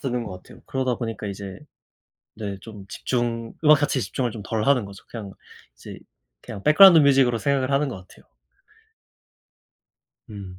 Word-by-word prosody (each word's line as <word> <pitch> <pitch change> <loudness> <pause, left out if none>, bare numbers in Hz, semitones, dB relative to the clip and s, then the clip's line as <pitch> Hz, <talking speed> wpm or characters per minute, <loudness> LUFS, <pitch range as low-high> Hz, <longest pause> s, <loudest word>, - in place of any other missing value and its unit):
듣는 125 -3 -3
것 90 -4 -9
같아요. - - -16
그러다 130 -2 -1
보니까 115 -3 -5
이제 100 -1 -7 0.8
네 100 -3 -5
좀 105 -2 -11
집중 115 0 -3
음악 150 0 +7
가치에 145 -2 0
집중을 120 +5 -2
좀 110 -2 -8
덜 110 +1 -2
하는 135 -5 +3
거죠. 100 -1 -12
그냥 105 -4 -8 0.4
이제 - - -11 0.4
그냥 100 - -9
백그라운드 170 +3 +8
뮤직으로 135 -5 +4
생각을 135 0 0
하는 140 +1 +1
것 95 -7 -9
같아요. - - -20 2.0
음 95 -3 -9
115 Hz, 325 characters per minute, -23 LUFS, 100-135 Hz, 2.0 s, 백그라운드